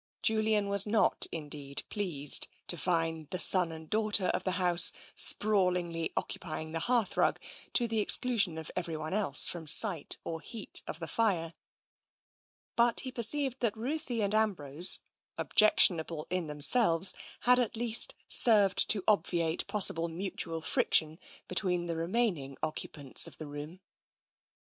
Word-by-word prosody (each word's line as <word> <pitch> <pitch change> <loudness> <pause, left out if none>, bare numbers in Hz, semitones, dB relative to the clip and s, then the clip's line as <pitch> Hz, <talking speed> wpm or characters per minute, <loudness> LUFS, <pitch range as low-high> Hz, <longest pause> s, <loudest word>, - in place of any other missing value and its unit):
Julian 215 -2 0
was 200 0 +5
not, 215 0 +2
indeed, 145 -3 -6
pleased 165 -9 +2 0.2
to - - -1
find 165 -3 -3
the 185 - -4
son 180 -2 +2
and 160 0 -10
daughter 210 -1 0
of - - -3
the 185 - -3
house 175 -1 +5 0.2
sprawlingly 180 -5 +1
occupying 155 -2 -6
the 165 - -3
hearthrug, 240 +2 -1 0.4
to 240 - +1
the 225 -1 -1
exclusion 210 -5 +2
of 160 - -7
everyone 160 -2 -5
else 195 -9 +4
from 165 -3 -5
sight 170 0 +3
or 165 -1 -7
heat 225 +1 -8
of 160 - -7
the 165 - -6
fire, 170 -5 -2 1.2
but 235 0 +2
he 260 - -6
perceived 265 +2 +4
that 225 -3 -2
Ruthie 250 -1 -4
and 200 +1 -2
Ambrose, 180 -7 +2 0.4
objectionable 165 -6 +1
in 185 -3 -3
themselves, 165 - +1 0.3
had 250 0 +3
at 240 -3 -2
least 240 - -2
served 205 -5 +3
to 200 -3 +2
obviate 170 -6 -1
possible 170 -5 +1
mutual 165 -1 -6
friction 160 0 0 0.3
between 180 -1 -1
the 170 -1 -5
remaining 165 - -3
occupants 145 -3 +1
of - - -13
the 155 - -9
room. 150 +5 -10
180 Hz, 140 wpm, -29 LUFS, 160-215 Hz, 1.2 s, was